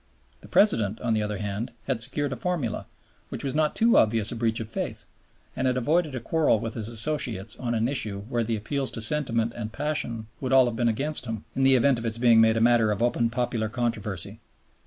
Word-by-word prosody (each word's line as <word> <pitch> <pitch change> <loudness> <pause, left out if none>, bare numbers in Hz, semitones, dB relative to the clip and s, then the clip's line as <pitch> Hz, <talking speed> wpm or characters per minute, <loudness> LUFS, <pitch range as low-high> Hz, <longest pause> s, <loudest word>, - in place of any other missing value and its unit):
The - - -13
President, 110 - +2
on 120 -2 0
the 110 - +1
other 105 -1 -3
hand, 105 +3 -4 0.2
had 130 -4 -1
secured 135 +3 -1
a - - -4
formula, 150 -4 -3 0.4
which - - -2
was 135 -2 -2
not 155 0 +1
too 230 +1 +4
obvious 110 -1 +3
a - - -4
breach 115 -1 0
of 115 - -5
faith, 115 - -5 0.5
and 130 - 0
had 125 0 +1
avoided 150 +3 +1
a - - -2
quarrel 150 -2 +1
with 115 +1 -4
his 110 -2 -5
Associates 115 -4 0
on 120 -2 -2
an 115 +1 +1
issue 110 -7 -2
where 120 +2 -2
the 115 0 -1
appeals 135 +6 -2
to - - -3
sentiment 115 -3 +2
and 110 -2 -5
passion 120 -5 -3
would 130 -1 -2
all 130 -1 +7
have 120 -2 -2
been 120 0 +1
against 135 +4 -1
him, 110 -2 -5
in 135 - -1
the 135 0 +5
event 130 0 +3
of 115 - -2
its 110 0 -2
being 115 -2 +5
made 110 0 +4
a - - +1
matter 115 -2 +4
of 105 +2 0
open 120 -1 +1
popular 115 -2 -2
controversy. 110 -6 -2
115 Hz, 225 wpm, -26 LUFS, 110-135 Hz, 0.5 s, all